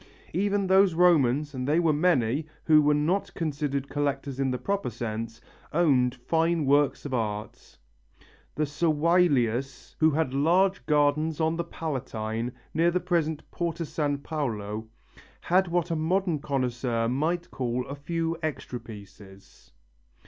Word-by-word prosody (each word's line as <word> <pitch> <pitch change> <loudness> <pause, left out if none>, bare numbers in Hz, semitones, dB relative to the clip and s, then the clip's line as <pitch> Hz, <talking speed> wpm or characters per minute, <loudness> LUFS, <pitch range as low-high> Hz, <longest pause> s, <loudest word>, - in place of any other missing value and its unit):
Even 200 +3 +1
those 190 -2 +4
Romans, 150 -5 +3
and 130 -1 -4
they 155 +3 +3
were 165 -3 +3
many, 150 -3 +1 0.2
who 155 -1 +6
were 150 0 +3
not 165 +7 0
considered 145 -3 -2
collectors 140 -2 -2
in 135 -1 +1
the 125 - -1
proper 200 +6 -2
sense, 115 0 -5 0.3
owned 135 -7 +3
fine 165 +4 0
works 145 +1 +2
of 140 - -4
art. 105 -3 -4 0.8
The 150 - +1
Servilius, 145 -5 +1
who 160 - +5
had 150 -3 0
large 180 +7 +2
gardens 150 +1 +2
on 160 0 +1
the 170 - -2
Palatine 120 -8 -4 0.2
near 165 +2 +3
the 180 +1 +1
present 165 -4 -1
Porta 170 -1 -3
San 145 -2 -1
Paolo, 110 -8 -4 0.5
had 185 +2 +2
what 175 0 -1
a - - +1
modern 170 +1 0
connoisseur 125 -4 -1
might 160 +8 -1
call 125 -1 -2
a 140 - -6
few 165 +3 -2
extra 150 -5 -4
pieces. 100 -3 -14
150 Hz, 140 wpm, -27 LUFS, 125-165 Hz, 0.8 s, who